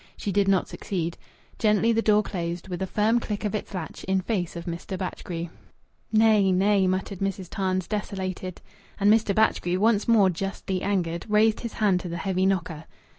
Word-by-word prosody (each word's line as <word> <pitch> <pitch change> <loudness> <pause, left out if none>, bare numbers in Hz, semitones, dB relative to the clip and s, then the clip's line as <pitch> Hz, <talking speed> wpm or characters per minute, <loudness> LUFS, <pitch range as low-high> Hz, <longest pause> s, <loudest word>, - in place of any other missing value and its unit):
She 205 - -3
did 200 +1 +2
not 195 -2 +3
succeed. 170 -3 -3 0.4
Gently 215 +1 +3
the 225 0 +2
door 210 -1 +4
closed, 175 -2 -4
with 180 0 -4
a 190 - -1
firm 215 +5 +2
click 210 -2 -4
of 210 - -1
its 215 - -4
latch, 180 -5 -6
in 190 0 +1
face 185 -3 -2
of 170 0 -6
Mr. 175 +2 -5
Batchgrew. 175 -2 -5 0.6
"Nay, 215 -3 +4
nay!" 195 +1 +3
muttered 185 +1 -2
Mrs. 195 -2 -3
Tarns, 185 -2 -1
desolated. 190 -3 -4 0.4
And 205 +1 +5
Mr. 215 -3 +2
Batchgrew, 185 -4 +2
once 215 0 +2
more 210 -5 +5
justly 190 +1 -3
angered, 175 -3 -1
raised 215 +1 +3
his 235 - -5
hand 200 -5 +2
to 180 - -6
the 170 - -4
heavy 190 0 0
knocker. 165 -5 -2
195 Hz, 180 wpm, -26 LUFS, 180-210 Hz, 0.6 s, And